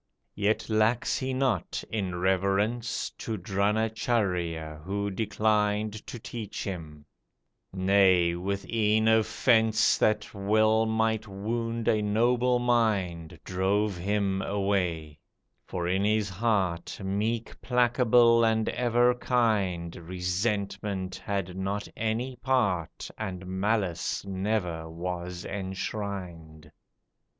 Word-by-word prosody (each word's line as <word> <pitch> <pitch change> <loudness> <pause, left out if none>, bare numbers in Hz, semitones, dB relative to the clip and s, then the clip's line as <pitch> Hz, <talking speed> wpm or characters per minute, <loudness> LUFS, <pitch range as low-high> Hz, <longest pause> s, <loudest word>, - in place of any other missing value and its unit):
Yet 105 +1 0
lacks 110 +3 +1
he 130 0 -2
not, 130 -2 -1
in 95 -5 -2
reverence 100 +6 0
To 110 -2 -3
Dronacharjya, 95 -5 -1
who 100 +3 -2
declined 105 +1 0
To - - -6
teach 110 -2 -6
him, 80 -6 -7 0.7
nay, 95 -2 +4
with 100 +3 -3
e'en 110 -1 +2
offence 110 0 +3
That 110 0 +1
well 110 +2 +3
might 110 0 0
wound 115 +3 -3
a 110 - +3
noble 120 +4 +2
mind, 100 -9 0
Drove 95 +2 0
him 95 +1 0
away; 90 -7 -1 0.5
for 85 -1 -3
in 95 +2 +1
his 105 -1 +1
heart 95 -4 -1
Meek, 110 +4 -2
placable, 120 -1 +4
and 110 -1 +2
ever 120 0 +3
kind, 105 -9 0
Resentment 95 +2 -2
had 95 -1 -3
not 100 +2 -3
any 115 +3 -2
part, 110 - 0
And 95 -1 -5
Malice 95 -1 -1
never 95 -4 -2
was 90 +1 -5
enshrined. 95 -5 -5
100 Hz, 100 wpm, -28 LUFS, 95-110 Hz, 0.7 s, nay